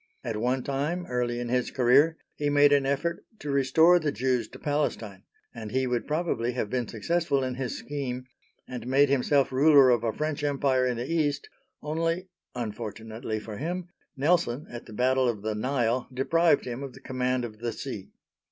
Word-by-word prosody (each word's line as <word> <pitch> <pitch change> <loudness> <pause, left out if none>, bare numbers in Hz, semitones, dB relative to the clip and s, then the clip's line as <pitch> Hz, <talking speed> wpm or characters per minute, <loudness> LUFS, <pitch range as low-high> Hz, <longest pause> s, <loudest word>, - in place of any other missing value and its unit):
At 115 -4 -3
one 125 +3 0
time, 150 +6 -2
early 120 -1 -1
in 120 -1 -4
his 125 0 +1
career, 140 +6 +4 0.2
he 145 -1 -1
made 145 0 +5
an 140 -1 +3
effort 170 +5 -1
to 145 -6 -5
restore 160 +6 +5
the 155 -3 -1
Jews 125 -3 0
to - - -12
Palestine, 130 - -2 0.3
and 110 -2 -7
he 130 +4 0
would 125 -1 -1
probably 150 -7 -1
have 110 -4 -3
been 125 -3 -1
successful 140 +5 0
in 130 -1 -2
his 130 -1 -4
scheme, 130 -3 -4 0.4
and 125 -1 -6
made 140 +2 +4
himself 140 +1 +2
ruler 140 -1 +6
of 120 -2 +2
a 115 - +1
French 155 +3 -3
Empire 135 -3 +2
in 125 -2 -1
the 120 - -3
East, 150 -4 0 0.3
only, 165 +4 -1 0.3
unfortunately 110 0 -5
for 105 -1 -8
him, 175 - -4 0.3
Nelson, 145 -2 +1
at 120 0 -8
the - - -10
battle 130 +2 +2
of 105 -4 -4
the 110 0 -1
Nile, 120 +1 0
deprived 150 +4 +2
him 125 +1 -5
of 135 -2 -6
the 135 - -13
command 130 -2 -1
of 110 -2 -9
the 120 0 -2
sea. - - -6
130 Hz, 185 wpm, -27 LUFS, 120-145 Hz, 0.4 s, ruler